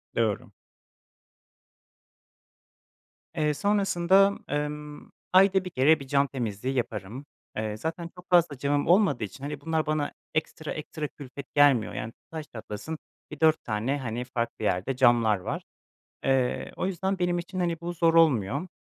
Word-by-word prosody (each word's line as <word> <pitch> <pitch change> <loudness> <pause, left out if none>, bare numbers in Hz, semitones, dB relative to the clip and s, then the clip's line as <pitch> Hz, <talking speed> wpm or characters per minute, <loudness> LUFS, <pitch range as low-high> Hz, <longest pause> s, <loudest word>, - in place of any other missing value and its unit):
Doğru. 110 -3 0 2.8
Eee, 150 -2 +1
sonrasında, 195 +1 +3
ımm, 150 0 -4 0.2
ayda 190 0 +5
1 - - -4
kere 155 0 +4
bir 140 - -9
cam 140 +1 +3
temizliği 125 -1 -3
yaparım. 115 +2 -3 0.3
Eee, 110 0 -2
zaten 165 +6 -4
çok 180 0 -14
fazla 170 -5 +4
camım 145 +2 0
olmadığı 170 - +4
için, 105 +6 -7
hani, 145 0 -5
bunlar 160 +1 0
bana 155 -1 -1 0.2
ekstra 155 0 -3
ekstra 155 0 -5
külfet 140 -1 -10
gelmiyor, 145 -6 +5
yani, 110 +2 -5 0.2
taş 160 -2 -5
çatlasın 110 +8 -6 0.3
bir 150 - -8
4 160 -1 +4
tane, 115 +6 -1
hani, 120 -2 -3
farklı 120 -3 -3
yerde 100 +9 0
camlar 120 -4 +4
var. 90 - -4 0.6
Eee, 130 -2 +1
o - - -1
yüzden 190 +1 -1
benim 175 -1 +1
için, 185 +2 -5
hani, 170 -2 -1
bu 175 +1 -4
zor 165 -1 +2
olmuyor. 140 - +3
145 Hz, 145 wpm, -27 LUFS, 125-170 Hz, 2.8 s, ayda